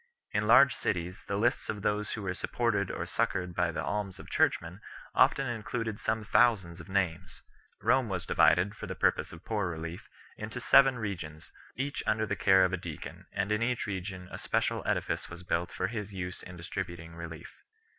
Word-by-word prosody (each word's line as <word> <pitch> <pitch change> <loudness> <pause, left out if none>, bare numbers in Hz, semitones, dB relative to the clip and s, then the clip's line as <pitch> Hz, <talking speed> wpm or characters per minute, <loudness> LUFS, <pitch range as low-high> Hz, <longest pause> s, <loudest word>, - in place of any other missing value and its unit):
In 105 - 0
large 135 +4 +8
cities 90 +1 -3
the 100 - -1
lists 120 +4 +1
of 105 -2 -3
those 105 0 0
who 105 - -4
were 90 -1 -1
supported 105 -1 0
or - - -3
succoured 90 -1 -1
by - - +1
the - - -3
alms 100 -2 -2
of - - -11
churchmen 90 +4 +1 0.3
often 135 - +4
included 115 -2 -3
some 110 0 -1
thousands 100 -7 +3
of 85 - -11
names. 90 -2 -1 0.4
Rome 130 -4 +3
was 90 -2 -2
divided, 95 +4 +4
for - - -7
the - - -4
purpose - - +1
of 85 +2 -12
poor 105 -5 0
relief, 80 +1 -6 0.3
into 110 +3 -5
seven 135 0 +6
regions, 85 -8 -5 0.2
each 140 +2 -2
under 110 0 +2
the 105 - -1
care 95 0 +5
of 90 - -1
a - - +1
deacon, 85 +1 -8
and 100 +1 -1
in 105 +1 +1
each 120 0 0
region 95 -2 -5
a - - -6
special - - 0
edifice - - 0
4 - - -10
was 90 - -12
built 85 0 -1
for 95 - -2
his 105 0 -4
use 90 -2 -5
in 90 -1 -10
dis 85 +2 -8
tributing 85 -3 -5
relief. 85 -1 -9
95 Hz, 195 wpm, -30 LUFS, 90-110 Hz, 0.4 s, large